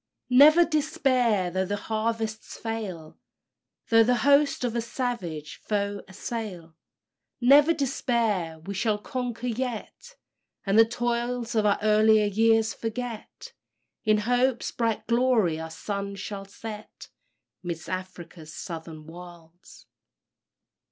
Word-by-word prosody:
"Never 305 +7 +8
despair, 255 - +1
though 185 +1 -1
the 205 - -1
harvests 220 +1 -3
fail; 200 -9 -6 0.7
Though 225 0 +6
the 250 +2 +3
hosts 285 -1 +4
of 240 -2 -1
a 235 - +1
savage 210 - -4
foe 205 -1 -2
assail; 190 -4 -6 0.6
Never 280 +6 +6
despair; 230 - 0
we 165 +5 -7
shall 210 +2 0
conquer 245 +2 -5
yet, 250 - -5 0.5
And 200 +2 +3
the 225 - +8
toils 240 0 -2
of 215 -2 +2
our 200 - +3
earlier 215 0 +5
years 225 +2 +3
forget 230 0 -6 0.5
In 215 -1 +3
hope's 245 +3 +1
bright 230 -2 -1
glory 235 -9 +2
our 160 0 -6
sun 200 +4 -5
shall 195 0 -6
set 210 +2 -10 0.5
'Midst 170 -2 -6
Afric's 175 -3 -7
Southern 160 -3 -8
Wilds." 170 0 -14
220 Hz, 115 wpm, -26 LUFS, 185-240 Hz, 0.7 s, Never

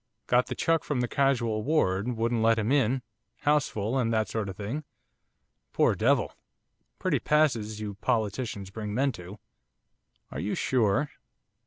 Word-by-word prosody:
Got 125 +1 +3
the - - -4
chuck 165 -1 +1
from 140 -4 -1
the 125 - 0
casual 120 -6 +1
ward, 105 -8 +1
wouldn't 115 0 0
let 115 0 +4
him 110 +2 0
in, 130 -2 +2 0.4
house 150 0 +3
full, 110 +5 -1
and 115 -2 +1
that 110 -2 +1
sort 105 -1 -2
of 95 - -8
thing, 115 +9 -4 0.9
poor - - +3
devil! - - +2 0.6
Pretty - - 0
passes 120 -9 +1
you 105 -1 -4
politicians 110 -4 -1
bring 105 0 -5
men 135 +3 +2
to!' 95 -1 -10 0.9
'Are 65 - -5
you 100 +7 -2
sure? 130 +3 +1
115 Hz, 155 wpm, -28 LUFS, 105-135 Hz, 0.9 s, let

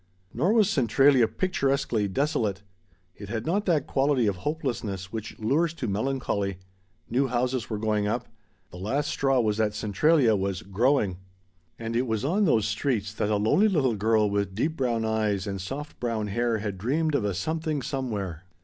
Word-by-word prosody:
Nor 170 - +2
was 220 -4 +5
Centralia 135 - +4
picturesquely 135 - 0
desolate. 105 -4 -1 0.5
It 100 -1 -9
had 110 +1 -3
not 200 +5 0
that 160 -6 +2
quality 135 -3 +2
of 100 -3 0
hopelessness 115 - -3
which 110 -2 -6
lures 150 +9 +1
to 125 - -4
melancholy. 100 -3 -1 0.5
New 130 +4 +1
houses 125 -1 -1
were 110 - -2
going 105 -1 0
up. - - -2 0.4
The 90 - -10
last 130 +10 -1
straw 135 -1 +2
was 110 -3 +1
that 105 -1 0
Centralia 115 +4 +3
was 95 -2 -2
"growing." 105 -1 +1 0.6
And 115 0 -4
it 125 +2 +1
was 110 +1 -1
on 195 +8 +2
those 110 - +3
streets 105 -2 -1
that 105 - -1
a 105 - +2
lonely 110 - +3
little 140 - +2
girl 110 +1 +2
with 100 -1 -1
deep 155 +9 0
brown 120 -5 0
eyes 110 -3 0
and 100 -2 -4
soft 140 +11 -6
brown 115 -3 -2
hair 120 +2 0
had 100 -3 -4
dreamed 150 - 0
of 140 - +1
a 100 -3 -1
Something 155 - -2
Somewhere. 100 - -4
115 Hz, 175 wpm, -26 LUFS, 105-140 Hz, 0.6 s, was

